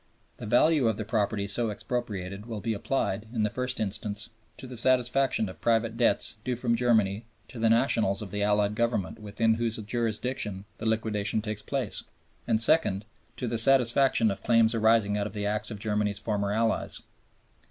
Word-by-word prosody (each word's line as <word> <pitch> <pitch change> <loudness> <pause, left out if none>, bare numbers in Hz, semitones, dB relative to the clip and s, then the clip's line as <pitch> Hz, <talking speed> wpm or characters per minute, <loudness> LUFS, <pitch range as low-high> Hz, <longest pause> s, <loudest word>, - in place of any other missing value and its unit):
The - - -7
value 140 +3 +4
of 110 -2 0
the 110 - -4
property 105 -2 -1
so 115 +3 0
expropriated 105 -3 -4
will 110 -3 -5
be 115 +2 -2
applied, 105 -1 -2
in 115 -3 -1
the 105 - 0
first 125 +1 -2
instance, 105 +1 -3 0.3
to - - -8
the 125 -1 -8
satisfaction 125 -1 +3
of 95 -4 -11
private 115 0 +1
debts 115 -2 +2
due 125 0 -1
from 120 -1 0
Germany 110 -3 +1 0.2
to 120 - -9
the 115 0 +3
nationals 115 -4 +2
of 95 - -9
the 105 0 -3
Allied 105 0 +2
Government 115 -4 -1
within 105 +2 0
whose 115 0 -1
jurisdiction 110 -2 -3
the 110 - -3
liquidation 110 -1 0
takes 105 -1 -4
place, 130 -2 -3 0.5
and, 110 - +2
second, 115 -6 +2 0.3
to 125 - -3
the 115 0 0
satisfaction 125 -2 +4
of 100 - -5
claims 115 -1 +3
arising 110 -2 +2
out 100 - -1
of - - -10
the 105 -1 -3
acts 105 +1 -1
of 105 - -6
Germany's 105 -1 -1
former 100 -2 -2
allies. 110 +1 0
110 Hz, 180 wpm, -27 LUFS, 105-120 Hz, 0.5 s, value